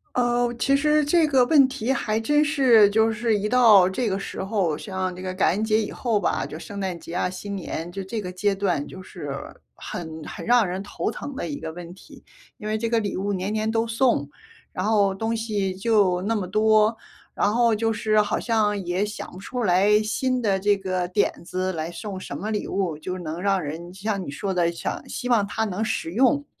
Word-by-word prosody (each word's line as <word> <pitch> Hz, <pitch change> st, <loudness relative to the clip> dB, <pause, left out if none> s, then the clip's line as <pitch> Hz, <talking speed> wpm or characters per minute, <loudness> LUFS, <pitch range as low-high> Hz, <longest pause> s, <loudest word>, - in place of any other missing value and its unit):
哦， 240 Hz, -1 st, +2 dB
其 275 Hz, +2 st, +2 dB
实 300 Hz, +1 st, +3 dB
这 320 Hz, +1 st, +3 dB
个 260 Hz, -4 st, +4 dB
问 275 Hz, -2 st, +6 dB
题 260 Hz, -1 st, -1 dB
还 215 Hz, -4 st, -1 dB
真 295 Hz, +6 st, +3 dB
是 255 Hz, -9 st, +5 dB
就 220 Hz, +2 st, +3 dB
是 220 Hz, -1 st, +1 dB
一 205 Hz, +1 st, -1 dB
到 220 Hz, -6 st, +6 dB
这 220 Hz, +4 st, -1 dB
个 190 Hz, -, -1 dB
时 195 Hz, -, -5 dB
候 195 Hz, -6 st, 0 dB
像 185 Hz, -3 st, -4 dB
这 185 Hz, -, -9 dB
个 185 Hz, 0 st, -3 dB
感 185 Hz, -, +3 dB
恩 210 Hz, +4 st, -1 dB
节 220 Hz, 0 st, +2 dB
以 210 Hz, -, -3 dB
后 230 Hz, -4 st, 0 dB
吧， -, -, 0 dB
就 155 Hz, -, -8 dB
圣 200 Hz, +4 st, -8 dB
诞 185 Hz, -3 st, -3 dB
节 165 Hz, -, -9 dB
啊、 180 Hz, -, 0 dB
新 200 Hz, +2 st, -6 dB
年， 175 Hz, -2 st, -5 dB
就 195 Hz, +1 st, -5 dB
这 215 Hz, +4 st, -4 dB
个 180 Hz, -3 st, -5 dB
阶 195 Hz, +2 st, 0 dB
段 180 Hz, -7 st, 0 dB
就 185 Hz, -, -10 dB
是 170 Hz, -6 st, -8 dB, 0.5 s
很 160 Hz, -2 st, -7 dB
很 -, -, -7 dB
让 240 Hz, -4 st, +4 dB
人 185 Hz, +2 st, -3 dB
头 205 Hz, +2 st, -3 dB
疼 275 Hz, +4 st, -7 dB
的 -, -, -4 dB
一 290 Hz, -1 st, -5 dB
个 160 Hz, -, -5 dB
问 175 Hz, 0 st, -9 dB
题。 190 Hz, -, -16 dB, 0.3 s
因 215 Hz, -3 st, -7 dB
为 215 Hz, -, 0 dB
这 230 Hz, +1 st, -2 dB
个 230 Hz, -1 st, +2 dB
礼 205 Hz, -2 st, -3 dB
物 200 Hz, +2 st, -1 dB
年 190 Hz, +3 st, -2 dB
年 215 Hz, 0 st, 0 dB
都 225 Hz, 0 st, +1 dB
送， 230 Hz, -, +1 dB, 0.5 s
然 185 Hz, -, -3 dB
后 205 Hz, -2 st, +3 dB
东 225 Hz, +3 st, -2 dB
西 205 Hz, -4 st, -2 dB
就 195 Hz, -3 st, +2 dB
那 225 Hz, +2 st, 0 dB
么 190 Hz, -4 st, -2 dB
多， 215 Hz, +2 st, +3 dB, 0.4 s
然 205 Hz, +1 st, +1 dB
后 235 Hz, -2 st, +3 dB
就 225 Hz, +1 st, 0 dB
是 215 Hz, -1 st, +2 dB
好 210 Hz, 0 st, +1 dB
像 210 Hz, -4 st, +1 dB
也 180 Hz, +4 st, 0 dB
想 210 Hz, -, -7 dB
不 185 Hz, -, -11 dB
出 245 Hz, +5 st, -5 dB
来 200 Hz, +3 st, +4 dB
新 255 Hz, +3 st, -1 dB
的 195 Hz, -3 st, +1 dB
这 205 Hz, +1 st, +3 dB
个 185 Hz, -2 st, -2 dB
点 195 Hz, +3 st, +1 dB
子 185 Hz, +1 st, -2 dB
来 165 Hz, 0 st, -4 dB
送 195 Hz, +1 st, -6 dB
什 -, -, -7 dB
么 215 Hz, -, -4 dB
礼 210 Hz, -1 st, -2 dB
物， 180 Hz, -6 st, -1 dB
就 185 Hz, +4 st, -5 dB
能 165 Hz, 0 st, -5 dB
让 195 Hz, -1 st, +1 dB
人 165 Hz, +4 st, -6 dB
就 190 Hz, -, -13 dB
像 205 Hz, -2 st, -1 dB
你 140 Hz, -, -6 dB
说 190 Hz, +5 st, -3 dB
的， 170 Hz, -1 st, +2 dB
想 170 Hz, -, -5 dB
希 250 Hz, -, -5 dB
望 220 Hz, -4 st, +3 dB
它 220 Hz, +2 st, -2 dB
能 210 Hz, +2 st, -2 dB
实 165 Hz, -, -2 dB
用， 265 Hz, +6 st, +3 dB
205 Hz, 245 characters per minute, -24 LUFS, 185-225 Hz, 0.5 s, 问